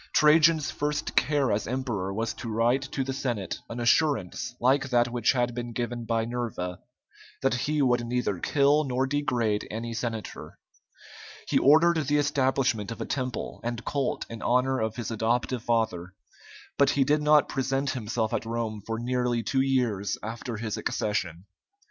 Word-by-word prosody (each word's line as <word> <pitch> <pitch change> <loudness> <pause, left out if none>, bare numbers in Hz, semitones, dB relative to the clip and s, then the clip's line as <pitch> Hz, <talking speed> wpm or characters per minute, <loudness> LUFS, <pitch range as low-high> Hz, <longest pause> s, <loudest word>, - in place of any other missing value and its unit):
Trajan's 155 -1 +5
first 150 +1 -2
care 140 -2 +2
as 105 +1 -1
emperor 120 -7 -2
was 110 +3 -2
to 115 - -7
write 120 +4 +2
to 135 - 0
the 135 0 -3
Senate 120 -8 -3
an 115 - -5
assurance 120 - +1
like 130 +2 +2
that 120 -1 +3
which 120 0 +2
had 120 -1 0
been 120 0 -5
given 120 0 -3
by 115 -1 0
Nerva, 115 -7 -4 0.6
that 135 - +3
he 145 +4 0
would 120 -2 +2
neither 120 -6 -1
kill 145 - +3
nor 130 -1 0
degrade 125 -7 0
any 115 +2 -4
senator. 115 -1 -5 0.9
He - - +3
ordered 160 +1 +4
the 145 +1 +3
establishment 130 -6 +1
of 115 - -6
a - - -3
temple 130 -4 -4
and 120 -1 -4
cult 140 -3 -1
in 115 -1 -8
honor 130 +2 +2
of 110 0 -2
his 120 -2 -4
adoptive 115 +2 0
father, 110 -7 -1 0.6
but 140 -1 +5
he 140 0 +3
did 150 +3 +2
not 150 0 +5
present 135 +1 -1
himself 110 -2 -2
at - - 0
Rome 115 -2 -3
for 115 +1 -3
nearly 120 0 0
two 135 +3 +1
years 125 -7 0
after 115 +1 -5
his 110 -1 -3
accession. 90 -4 -2
120 Hz, 165 wpm, -27 LUFS, 115-135 Hz, 0.9 s, Trajan's